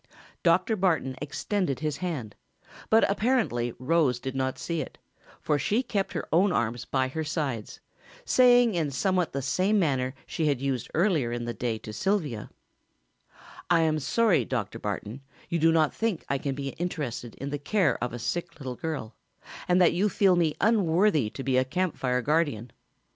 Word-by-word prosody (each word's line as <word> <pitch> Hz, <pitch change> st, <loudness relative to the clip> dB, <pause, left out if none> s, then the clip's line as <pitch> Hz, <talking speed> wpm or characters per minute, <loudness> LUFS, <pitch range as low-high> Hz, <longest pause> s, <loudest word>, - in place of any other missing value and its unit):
Dr. 185 Hz, +6 st, +3 dB
Barton 165 Hz, -9 st, +1 dB
extended 150 Hz, -, -2 dB
his 150 Hz, -2 st, -1 dB
hand, 150 Hz, -, -4 dB, 0.6 s
but 225 Hz, +1 st, +5 dB
apparently 200 Hz, -, +1 dB
Rose 135 Hz, -2 st, +2 dB
did 130 Hz, +1 st, -5 dB
not 130 Hz, 0 st, -1 dB
see 170 Hz, -2 st, -2 dB
it, -, -, -8 dB, 0.4 s
for 150 Hz, -2 st, 0 dB
she 225 Hz, -, +1 dB
kept 200 Hz, -5 st, -2 dB
her -, -, -4 dB
own 185 Hz, +4 st, +4 dB
arms 120 Hz, -6 st, -1 dB
by 130 Hz, -1 st, 0 dB
her 160 Hz, +4 st, -3 dB
sides, 145 Hz, -8 st, -3 dB, 0.4 s
saying 245 Hz, -2 st, +5 dB
in 165 Hz, -4 st, 0 dB
somewhat 180 Hz, +5 st, 0 dB
the 140 Hz, 0 st, -3 dB
same 185 Hz, +10 st, +1 dB
manner 135 Hz, -7 st, 0 dB
she 160 Hz, -, -1 dB
had 140 Hz, -4 st, +1 dB
used 130 Hz, -3 st, -2 dB
earlier 160 Hz, -, +2 dB
in 120 Hz, 0 st, -3 dB
the 120 Hz, -, -3 dB
day 115 Hz, -2 st, -2 dB
to 110 Hz, 0 st, -9 dB
Sylvia: 155 Hz, -, -1 dB, 1.2 s
"I 170 Hz, -1 st, +4 dB
am 155 Hz, -1 st, +2 dB
sorry, 220 Hz, -, +2 dB
Dr. 115 Hz, -6 st, -3 dB
Barton, 105 Hz, +5 st, -5 dB, 0.3 s
you 170 Hz, -, 0 dB
do 165 Hz, +1 st, +5 dB
not 160 Hz, -2 st, +3 dB
think 225 Hz, -7 st, -2 dB
I 140 Hz, -, 0 dB
can 135 Hz, -1 st, -3 dB
be 140 Hz, 0 st, -4 dB
interested 140 Hz, -9 st, -4 dB
in 140 Hz, +1 st, -6 dB
the 145 Hz, -, -3 dB
care 180 Hz, -, +1 dB
of 120 Hz, -, -2 dB
a 120 Hz, -, -5 dB
sick 170 Hz, +8 st, -4 dB
little 130 Hz, -3 st, -5 dB
girl, 140 Hz, -7 st, -4 dB, 0.5 s
and 180 Hz, 0 st, +4 dB
that 175 Hz, -2 st, +5 dB
you 195 Hz, +5 st, +2 dB
feel 195 Hz, -3 st, +3 dB
me 165 Hz, -3 st, +1 dB
unworthy 185 Hz, -, +3 dB
to 135 Hz, -, -7 dB
be 130 Hz, -1 st, +1 dB
a -, -, +3 dB
Camp 180 Hz, +6 st, -1 dB
Fire 125 Hz, -1 st, -1 dB
guardian. 145 Hz, -7 st, 0 dB
155 Hz, 180 wpm, -27 LUFS, 130-180 Hz, 1.2 s, but